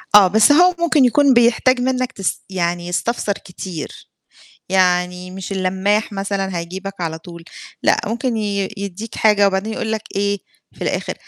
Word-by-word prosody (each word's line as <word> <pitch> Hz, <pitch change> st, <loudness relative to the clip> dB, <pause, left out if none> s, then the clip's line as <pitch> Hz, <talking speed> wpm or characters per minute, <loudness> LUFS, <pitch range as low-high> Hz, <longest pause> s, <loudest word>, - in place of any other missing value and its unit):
آه، 200 Hz, -2 st, +9 dB
بس 220 Hz, +8 st, +5 dB
هو 355 Hz, +4 st, +5 dB
ممكن 310 Hz, -6 st, +3 dB
يكون 275 Hz, +2 st, +4 dB
بيحتاج 240 Hz, +2 st, +3 dB
منّك 255 Hz, 0 st, 0 dB
تس 195 Hz, -, -3 dB
يعني 175 Hz, -1 st, -2 dB
يستفسر 205 Hz, +3 st, -1 dB
كتير، 180 Hz, -4 st, -8 dB, 0.6 s
يعني 180 Hz, -1 st, +1 dB
مش 190 Hz, +1 st, -7 dB
اللماح 195 Hz, +3 st, 0 dB
مثلًا 195 Hz, -2 st, -2 dB
هيجيبك 190 Hz, +3 st, -6 dB
على 160 Hz, -1 st, -3 dB
طول، 170 Hz, -1 st, -11 dB, 0.4 s
لأ -, -, +4 dB
ممكن 235 Hz, +2 st, -2 dB
ي 200 Hz, -2 st, -1 dB
يدّيك 200 Hz, +3 st, -6 dB
حاجة 210 Hz, -2 st, +4 dB
وبعدين 195 Hz, +3 st, -1 dB
يقول 220 Hz, 0 st, -3 dB
لك 220 Hz, -1 st, -2 dB
إيه 200 Hz, 0 st, 0 dB, 0.4 s
في -, -, -20 dB
الآخر: -, -, -2 dB
200 Hz, 155 wpm, -19 LUFS, 185-225 Hz, 0.6 s, آه